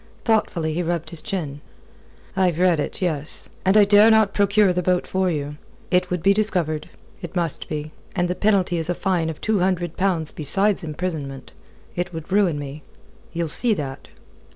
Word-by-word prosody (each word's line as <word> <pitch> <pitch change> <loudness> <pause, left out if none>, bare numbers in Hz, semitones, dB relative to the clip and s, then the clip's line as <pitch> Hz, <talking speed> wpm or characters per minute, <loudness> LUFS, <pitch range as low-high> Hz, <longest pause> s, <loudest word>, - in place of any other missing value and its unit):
Thoughtfully 175 -8 +1
he 175 - -1
rubbed 170 -2 -2
his 165 -2 -6
chin. 155 -8 -4 0.7
"I've 185 -4 +2
read 175 -3 +3
it 150 - -3
yes. 155 -4 -1
And 190 +3 +4
I 210 - +7
dare 205 +2 +6
not 220 -2 +4
procure 200 -1 +3
the 180 - 0
boat 180 0 +1
for 190 0 0
you. 150 -2 -3 0.3
It 180 0 +2
would 180 -2 -2
be 195 +1 +5
discovered. 180 -8 0 0.3
It 175 -1 -8
must 170 -4 0
be. 155 0 -4 0.2
And 175 -2 +1
the 180 - -1
penalty 190 -3 +1
is 165 - -2
a 175 - 0
fine 175 -4 0
of 160 - -6
two 220 -2 0
hundred 175 -2 -1
pounds 175 -5 0
besides 195 +7 +1
imprisonment. 150 - -5 0.4
It 180 +1 -3
would 160 +3 -7
ruin 190 -6 +3
me. 145 +1 -7 0.5
You'll 170 -1 -2
see 215 +9 +1
that?" 135 -5 -6
175 Hz, 180 wpm, -22 LUFS, 155-195 Hz, 0.7 s, I